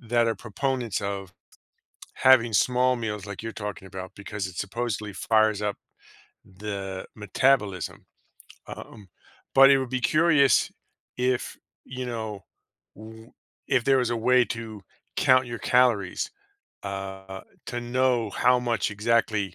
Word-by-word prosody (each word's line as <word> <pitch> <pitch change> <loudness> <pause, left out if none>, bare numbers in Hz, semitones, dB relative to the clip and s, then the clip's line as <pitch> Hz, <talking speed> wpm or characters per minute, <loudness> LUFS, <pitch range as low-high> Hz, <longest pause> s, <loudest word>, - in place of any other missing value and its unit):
that 120 -1 +1
are 115 - +1
proponents 125 -1 -2
of 100 -2 -4 0.8
having 130 -3 +5
small 125 +5 +3
meals 105 -3 -4
like 100 +1 -7
you're 115 - -5
talking 105 -3 -6
about 95 -1 -8
because 100 -1 -5
it, 90 -2 -10
supposedly, 105 -1 -3
fires 110 0 +2
up 105 -1 -2 0.7
the 95 -1 -6
metabolism. 105 -3 0 0.6
Um, 105 -4 -10 0.5
but 135 +1 +9
it 135 - +5
would 130 - -4
be 130 0 -1
curious 155 -3 +4 0.5
if, 125 0 -1 0.3
you 130 -1 -6
know, 110 -5 -5 0.5
w 110 +2 -12 0.4
if 130 -3 +2
there 135 -1 +4
was 125 -2 0
a 120 - 0
way 125 +2 +4
to 110 -3 -6 0.4
count 130 0 +4
your 120 -2 -6
calories, 125 - +2 0.6
uh, 95 -1 -6 0.3
to 120 - -4
know 120 -2 +1
how 125 +4 +3
much 115 -5 0
exactly 105 -3 0
115 Hz, 130 wpm, -26 LUFS, 100-125 Hz, 0.8 s, but